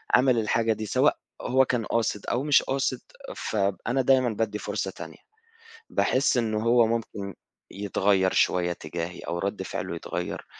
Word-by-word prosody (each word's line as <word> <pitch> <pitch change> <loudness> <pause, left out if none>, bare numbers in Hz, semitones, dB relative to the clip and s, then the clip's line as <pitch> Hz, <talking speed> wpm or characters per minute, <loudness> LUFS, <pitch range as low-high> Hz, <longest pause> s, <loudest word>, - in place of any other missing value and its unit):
عمل 125 -1 +4
الحاجة 115 +1 +1
دي، 110 0 -5
سواء - - +2 0.2
هو 130 +1 +3
كان 120 -4 -1
قاصد 110 -3 -1
أو 125 +3 -1
مش 145 -1 +5
قاصد، 135 +1 -1 0.3
فأنا 105 +5 -1
دايمًا 130 -1 +4
بادي 110 -1 -2
فرصة - - -3
تانية - - -10 0.7
باحس 130 0 +2
إنه 110 -3 0
هو 115 0 +4
ممكن 105 -4 -3 0.4
يتغيّر 100 -1 +1
شوية 90 -1 +2
تجاهي 85 +2 -5
أو 85 - -4
رد 100 +2 -2
فعله - - -4
يتغير - - -5
110 Hz, 145 wpm, -26 LUFS, 100-125 Hz, 0.7 s, مش